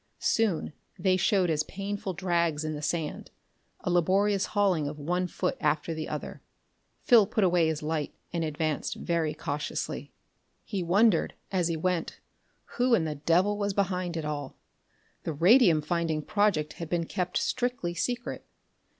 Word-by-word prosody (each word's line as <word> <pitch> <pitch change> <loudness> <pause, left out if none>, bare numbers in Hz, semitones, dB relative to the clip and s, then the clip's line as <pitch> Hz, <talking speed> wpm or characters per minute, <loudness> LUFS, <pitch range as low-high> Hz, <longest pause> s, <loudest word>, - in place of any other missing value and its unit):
Soon 205 -9 0 0.2
they 190 -2 +2
showed 185 -2 +2
as 150 -1 +1
painful 195 +2 -4
drags 170 -4 0
in 155 - -2
the 150 - -5
sand, 155 0 -3 0.5
a 180 - -1
laborious 190 +3 +2
hauling 185 -7 +3
of 145 +1 -5
one 180 +5 -1
foot - - -2
after 150 +2 0
the 160 -1 -5
other.... 150 - -5 0.6
Phil 225 -5 +6
put 220 -1 0
away 175 -3 +4
his 155 -1 -2
light 155 -1 -2 0.2
and 170 -1 0
advanced 155 -1 -2
very 165 -3 -1
cautiously. 150 -2 -4 0.5
He 200 -4 -3
wondered, 185 +1 +3 0.2
as 180 -3 +1
he 165 -1 -1
went, 180 0 -1 0.6
who 245 -1 +4
in 165 - 0
the 155 - -2
devil 175 +8 +2
was 200 -1 -1
behind 180 -3 -1
it 160 - -3
all. 145 -2 -4 0.6
The 165 - -3
radium 175 - +5
finding 160 -1 -1
project 195 -8 +1
had 165 - -5
been 170 -1 0
kept 180 0 -2
strictly 245 -9 -1
secret. 240 +7 -3
170 Hz, 155 wpm, -28 LUFS, 155-195 Hz, 0.6 s, Phil